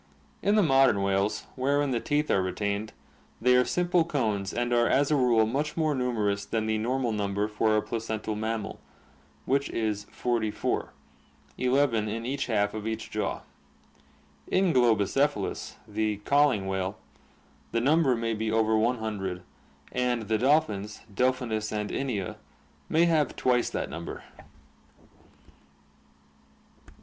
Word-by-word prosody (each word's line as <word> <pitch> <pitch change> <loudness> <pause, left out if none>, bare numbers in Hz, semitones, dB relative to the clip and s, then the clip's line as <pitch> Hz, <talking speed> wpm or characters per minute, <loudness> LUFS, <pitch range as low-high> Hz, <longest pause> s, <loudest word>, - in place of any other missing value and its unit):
In 205 +1 +2
the 210 - +5
modern 135 - +4
whales, 100 +2 0
wherein 140 +2 +1
the 120 - +1
teeth 150 +4 0
are 95 - +3
retained, 100 +3 -2 0.5
they 125 +2 +4
are 125 - +5
simple 175 +3 +2
cones 110 -11 -1
and 120 0 -1
are 120 0 +4
as 140 +2 +2
a - - +4
rule 120 -5 +4
much 145 +8 -2
more 155 -2 +2
numerous 110 -6 0
than 110 +2 -2
the 110 0 0
normal 125 +2 0
number 100 -1 -1
for 110 0 +1
a 105 - +1
placental 110 -1 -3
mammal, 110 0 -3 0.7
which 140 +1 +1
is 105 -2 -2
forty 120 -3 -1
four, - - -2 0.6
eleven 125 -4 +2
in 115 +2 -4
each 135 +2 -2
half 105 -3 +1
of 110 0 -5
each 110 0 -4
jaw. 105 -1 -2 1.1
In 185 -2 +2
Globicephalus, 120 0 +1
the 105 0 -1
ca'ing 140 -9 +3
whale, 95 +1 -2 0.7
the 115 - +1
number 140 +1 +3
may 115 0 -1
be 110 0 -2
over 110 0 +2
one 115 +3 +2
hundred, 95 -5 -4 0.5
and 125 -2 0
the 110 0 0
dolphins, 110 -6 +1
Delphinus 125 -2 0
and 105 -1 -3
Inia, 110 -9 -3 0.5
may 165 +2 +4
have 155 -5 +2
twice 125 -1 +2
that - - -3
number. 85 +2 -6
115 Hz, 140 wpm, -28 LUFS, 105-130 Hz, 1.1 s, the